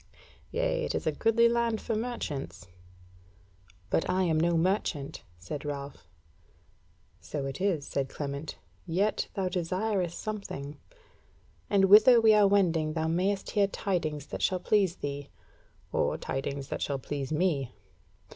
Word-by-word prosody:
Yea, - - 0
it - - -2
is - - -2
a - - +2
goodly 230 +1 +3
land 235 -1 +1
for 225 - -2
merchants." 215 - -4 1.2
"But - - +1
I 185 +1 +2
am 160 -3 +2
no 170 +1 +2
merchant," 165 -5 -1 0.2
said 90 - -6
Ralph. 140 - -6 1.1
"So 135 +10 -5
it 135 +5 -5
is," 180 -8 +1
said 135 -1 -2
Clement, 140 +1 -5 0.3
"yet 195 +6 0
thou 190 -2 0
desireth 185 +1 -1
something; 180 -9 -6 0.9
and 195 -1 +4
whither 215 +5 +8
we 220 -1 +6
are 210 -1 +6
wending 165 -6 +2
thou 160 0 -1
mayst 190 +4 0
hear 205 -2 +3
tidings 160 -8 -2
that - - -3
shall 185 -1 +1
please 190 -2 +2
thee, 140 -3 -5 0.6
or - - +1
tidings 135 0 -4
that - - -4
shall 140 - -1
please 135 +1 -5
me. 150 -6 0
175 Hz, 140 wpm, -29 LUFS, 145-205 Hz, 1.2 s, whither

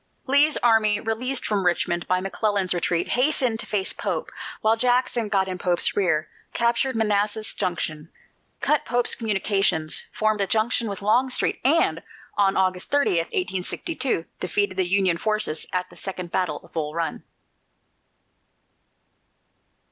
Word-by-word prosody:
Lee's 285 +3 +4
army, 220 -3 +4
released 235 +4 0
from 205 -3 0
Richmond 175 -1 0
by 185 0 +1
McClellan's 195 -1 0
retreat, 175 -1 -1
hastened 250 -3 +2
to - - -3
face 195 -3 -1
Pope, - - -3 0.3
while 220 +1 +3
Jackson 245 -2 +1
got 195 -2 +1
in 185 -1 -5
Pope's 175 -1 +1
rear, 175 -6 +1 0.3
captured 235 +2 +1
Manassas 215 0 0
Junction, 165 -4 -3 0.5
cut 300 - +2
Pope's 245 0 +1
communications, 195 -7 +1
formed 215 -1 0
a 195 - +1
junction 225 +2 +1
with 200 0 -6
Longstreet, 250 +5 +2
and 315 +6 +3 0.3
on 195 -1 +2
August 185 -1 0
30, 285 -11 +2
1862, 185 - -2
defeated 190 +2 -1
the 185 -1 +1
Union 190 -3 +2
forces 215 -7 0
at 180 0 -1
the - - -15
second 185 -3 -6
battle 185 -1 -1
of - - -21
Bull 155 -1 -3
Run. 165 -2 -2
205 Hz, 135 wpm, -24 LUFS, 180-230 Hz, 0.5 s, Lee's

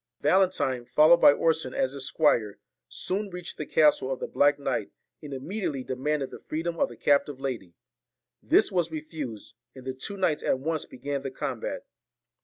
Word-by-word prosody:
Valentine, 180 -10 +2
followed 155 +7 +6
by - - +9
Orson 160 -3 0
as 130 - +1
his 135 -2 -4
squire, 115 -10 +2 0.3
soon 200 +2 -2
reached 180 -1 -8
the 150 - -4
castle 150 -4 +3
of 130 - -3
the - - -3
black 145 0 +3
knight, 140 - -2 0.3
and 150 -2 -9
imme 165 +11 -5
diately 140 -8 -2
demanded 135 +2 -2
the - - -9
freedom 165 +2 -4
of - - +2
the 120 - -12
captive 140 0 +2
lady. 115 -11 -5 0.7
This 370 - +3
was 175 -3 +1
refused, 150 -10 -7 0.2
and 130 -1 -11
the 130 - -3
two 165 +10 -6
knights 175 -6 +1
at - - +1
once 155 +3 -2
began 140 +2 -4
the 135 - -4
combat. 130 - -4
145 Hz, 180 wpm, -27 LUFS, 130-165 Hz, 0.7 s, by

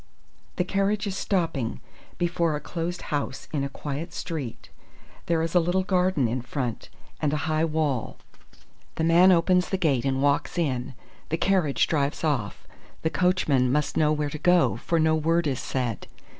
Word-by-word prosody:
"The 180 - +1
carriage 200 +3 0
is 195 -2 -3
stopping 165 - -1 0.4
before 170 -2 0
a - - -2
closed 170 +3 -4
house 145 -2 -3
in 140 -2 0
a 140 - -2
quiet 145 +4 -5
street. 145 -9 -6 0.6
There 165 -1 +1
is 165 - -3
a 180 - +6
little 175 +3 +1
garden 185 - +2
in 120 +3 -2
front, 125 -1 -4 0.3
and 150 - +1
a 150 0 -2
high 155 0 +1
wall. 150 -6 -1 0.8
The 160 - -1
man 170 +3 +6
opens 180 +1 +3
the 190 - 0
gate 145 -9 +1
and 135 -1 0
walks 145 +4 +1
in. 130 -5 -1 0.3
The 165 - 0
carriage 180 -7 +2
drives 145 -1 -1
off. 135 -10 -1 0.4
The 160 - +1
coachman 155 -9 +2
must 150 +2 0
know 155 -1 +3
where 150 -1 -1
to 150 - -6
go, 175 +1 +4
for 170 - 0
no 160 0 +3
word 165 +2 +1
is 135 -4 -1
said. 125 -5 -3
155 Hz, 170 wpm, -26 LUFS, 140-175 Hz, 0.8 s, a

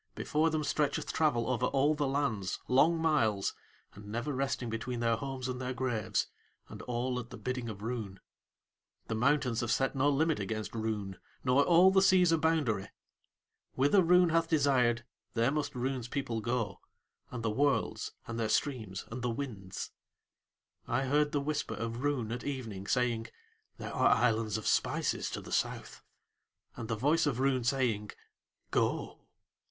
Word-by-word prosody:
Before 155 +2 +1
them 155 -1 -1
stretcheth 145 0 -1
travel 140 -7 +2
over 125 0 +1
all 140 +2 +2
the 145 -2 -1
lands, 130 -9 -1
long 155 +6 +4
miles, 110 -12 +1 0.4
and 105 +1 -12
never 120 +7 -3
resting 130 -2 -1
between 115 +2 -3
their 115 -1 +2
homes 130 +1 -4
and 130 0 -4
their 130 0 -3
graves 120 -4 0 0.4
and - - -9
all 125 +1 -2
at 120 -1 -8
the 125 - -9
bidding 125 +1 -3
of 100 -1 -8
Roon. 110 -5 -4 0.9
The - - 0
Mountains 125 0 +2
have 120 - -2
set 135 +4 +1
no 135 +2 +3
limit 155 +1 +2
against 110 +2 -4
Roon 105 -4 -3 0.2
nor 130 +2 +4
all 175 +4 +6
the 190 0 +5
seas 185 -3 +5
a 165 - +3
boundary. 145 -12 +1 0.9
Whither 145 +9 +4
Roon 180 0 +5
hath 165 0 +2
desired 125 -6 +2 0.3
there 115 +3 +3
must 150 -2 -2
Roon's 125 -1 -2
people 120 -4 -3
go, 115 -4 -2 0.5
and 120 -2 -6
the 110 - +1
worlds 140 +5 0
and 115 0 -5
their 110 -2 0
streams 110 -7 -1
and 125 +2 -5
the 125 - -1
winds. 115 -7 -5 1.0
I 130 +3 0
heard 145 +2 +2
the 145 - +1
whisper 150 +1 -2
of 115 +2 -4
Roon 135 -6 -1
at 120 +1 -4
evening, 115 -9 -5
saying: 120 -2 +1 0.5
"There - - -6
are - - +4
islands 110 -2 +1
of 110 - -7
spices - - +1
to - - -5
the - - -11
South," - - -2 0.7
and 115 - -6
the 115 - -1
voice 150 +8 +2
of 130 -4 -1
Roon 130 -2 +2
saying: 120 -5 0 0.6
"Go." - - 0
125 Hz, 165 wpm, -31 LUFS, 115-145 Hz, 1.0 s, all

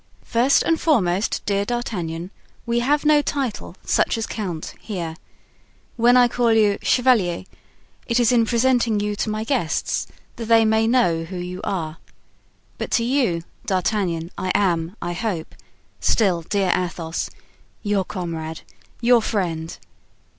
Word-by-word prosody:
"First 250 +4 +3
and 330 -1 +1
foremost, 200 - +1
dear 200 -1 +1
D'Artagnan, 185 -7 -3 0.3
we 235 0 +1
have 290 +5 +1
no 300 -1 +5
title 265 -11 -3
such - - +2
as 225 - -2
count 180 -7 -5
here. 170 -7 -5 0.8
When 245 +1 +5
I 245 -1 +6
call 240 -1 +2
you 210 -2 +3
'chevalier,' 230 -10 +2 0.6
it 235 0 +2
is 240 0 +4
in 230 -2 +3
presenting 240 -2 +2
you 210 0 -1
to 220 - -1
my 215 0 -2
guests, 225 - -1 0.3
that 230 - -5
they 225 0 +5
may 220 +1 +3
know 175 -10 +2
who 185 +2 -7
you 180 +1 -5
are. 165 -4 -3 0.8
But - - -3
to 230 - +3
you, 235 -10 +1 0.2
D'Artagnan, 185 -3 0
I 185 - 0
am, 175 -2 +1
I 175 0 -2
hope, 180 -4 -3 0.5
still 190 -6 +2
dear 190 +2 +1
Athos, 170 -2 -3 0.5
your 205 -2 +1
comrade, 165 -4 -5 0.4
your 240 0 +5
friend. 170 -7 -2
205 Hz, 140 wpm, -22 LUFS, 175-235 Hz, 0.8 s, I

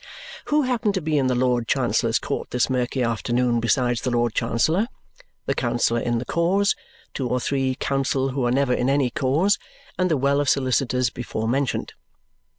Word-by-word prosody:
Who 300 0 +2
happen 240 -5 0
to 190 - 0
be 155 -1 +1
in 130 - +1
the 130 - +1
Lord 125 -2 +1
Chancellor's - - +1
court - - -4
this 125 +1 0
murky 125 0 0
afternoon 120 +1 0
besides 120 +1 +1
the - - -1
Lord 120 -2 +1
Chancellor, 140 - +1 0.6
the - - 0
counsel 120 -1 0
in 120 0 0
the 120 - -3
cause, 190 +4 +1 0.4
two 130 -3 -3
or 125 - +1
three 135 0 -1
counsel 135 0 0
who 135 0 -2
are - - +1
never 135 0 +2
in 125 +1 0
any 135 -3 +2
cause, 155 +8 +1 0.4
and 185 0 +2
the 155 - +2
well 140 +2 +2
of 145 - 0
solicitors 130 -2 +1
before 110 -2 -4
mentioned? 135 +2 -1
130 Hz, 180 wpm, -23 LUFS, 120-140 Hz, 0.6 s, Who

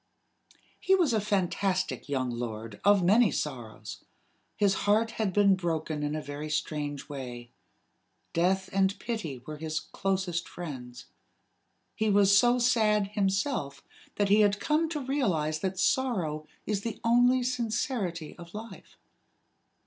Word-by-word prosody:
He 385 - +4
was 340 -10 +2
a 220 - +2
fantastic 190 -3 -1
young 130 -3 -1
lord 115 -3 -6
of 200 -2 +5
many 210 +5 +5
sorrows. 110 -6 -5 0.5
His 200 -2 +3 0.2
heart 225 +2 +3
had 215 -4 -1
been 200 +1 +5
broken 160 -4 -2
in 150 +1 -1
a 155 - -4
very 145 +2 -6
strange 150 -2 -3
way. 125 -4 -7 0.8
Death 190 +3 +1
and 195 0 +2
Pity 160 - -4
were 155 +1 -7
his 155 0 -3
closest 190 -3 -2
friends. 130 -8 -8 0.9
He 220 0 0
was 200 -1 +5
so 240 +4 +5
sad 215 -5 +2
himself 195 - -1 0.3
that 205 -1 +1
he 210 +2 +6
had 205 0 +3
come 310 +6 +1
to 300 -5 -4
realize 175 - 0
that 190 +2 -2
sorrow 185 -11 0 0.2
is 205 -2 -1
the 225 0 -5
only 245 +2 +4
sincerity 230 - -2
of 170 +2 -11
life. 215 -2 -10
190 Hz, 135 wpm, -29 LUFS, 150-220 Hz, 0.9 s, he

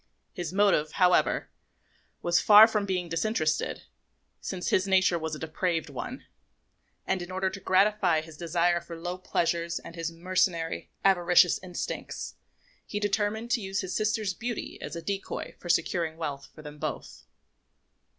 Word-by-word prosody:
His 175 -2 -4
motive, 190 -6 +2
however, 180 -2 +3 0.7
was 175 0 +3
far 210 +1 +9
from 210 -3 -1
being 180 -2 -1
disinterested, 165 -2 -1 0.6
since 185 -2 -4
his 190 +1 +2
nature 185 -2 +3
was 160 -1 -3
a - - -9
depraved 160 -1 -2
one; 235 - -6 0.8
and 190 -1 0
in 175 - -7
order 190 0 -1
to - - -7
gratify 190 -3 +3
his 160 0 -12
desire 170 +1 +1
for 170 0 -9
low 175 +2 -5
pleasures 170 -1 -1
and - - -9
his 165 -1 -4
mercenary, 170 -1 -1 0.2
avaricious 180 -2 +5
instincts, 180 -2 -5 0.5
he 205 - -3
determined 210 +3 -1
to 235 - +2
use 195 0 -2
his 185 - -4
sister's 215 -2 0
beauty 235 +3 -5
as - - -6
a 170 - -6
decoy 195 +2 -4
for 175 - -9
securing 165 -1 +1
wealth 140 -4 -5
for 155 - -12
them 150 0 -10
both. - - -6
180 Hz, 150 wpm, -28 LUFS, 165-195 Hz, 0.8 s, far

